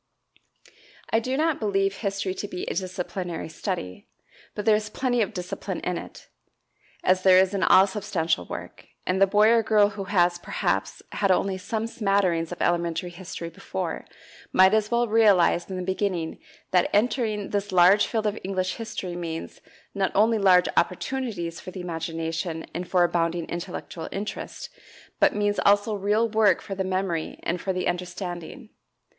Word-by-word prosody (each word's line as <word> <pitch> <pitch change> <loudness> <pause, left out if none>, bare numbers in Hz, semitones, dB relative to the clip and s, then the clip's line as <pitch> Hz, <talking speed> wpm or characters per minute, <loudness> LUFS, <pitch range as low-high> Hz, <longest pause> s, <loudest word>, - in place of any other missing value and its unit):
I 225 - +4
do 255 +3 -2
not 315 0 +1
believe 195 -2 0
history 195 -2 -2
to 205 - -5
be 180 - -6
a - - -3
"disciplinary 180 -2 -4
study," 155 - -5 0.5
but 210 - -4
there 220 - +6
is 210 0 -2
plenty 245 +1 0
of 205 - 0
discipline 180 -1 -5
in - - -2
it, - - -12 0.8
as 185 0 +3
there 185 -1 +6
is 190 +1 +4
in 195 - -1
all 190 - +7
substantial 190 - -1
work, - - -8 0.2
and 185 +1 0
the 195 - +7
boy 210 +2 +5
or 230 0 +5
girl 210 -2 +4
who 200 -1 -6
has, 175 -2 +2
perhaps, - - -2
had 195 - 0
only 190 +1 +2
some 220 +3 -3
smatterings 195 -7 0
of 175 - -3
elementary 170 0 0
history 175 -1 -7
before, - - -5 0.5
might 190 +2 +6
as 215 -1 +2
well 240 0 +2
realize 205 -6 +4
in 190 - -4
the 185 - -3
beginning 185 -3 -2 0.3
that 180 -1 +3
entering 215 -2 0
this 205 0 -2
large 185 +3 +6
field 220 -2 -1
of 210 0 -1
English 185 -1 -2
history 215 -6 -5
means, 165 -2 -6 0.3
not 195 -1 0
only 220 +2 +4
large 185 -2 +5
opportunities 180 -3 -1
for - - -9
the 185 - -8
imagination 165 -1 -4
and 180 +1 -5
for 180 -2 +4
abounding 170 -1 0
intellectual 170 -1 -6
interest, 205 - -6 0.5
but 295 -2 +4
means 205 0 0
also 205 +2 +3
real 210 +3 +1
work 215 -3 +3
for 195 - -7
the 190 0 -2
memory 185 -3 -2
and 175 +1 -2
for 190 - -1
the 185 0 -2
understanding. 180 +5 -5
190 Hz, 165 wpm, -25 LUFS, 175-210 Hz, 0.8 s, all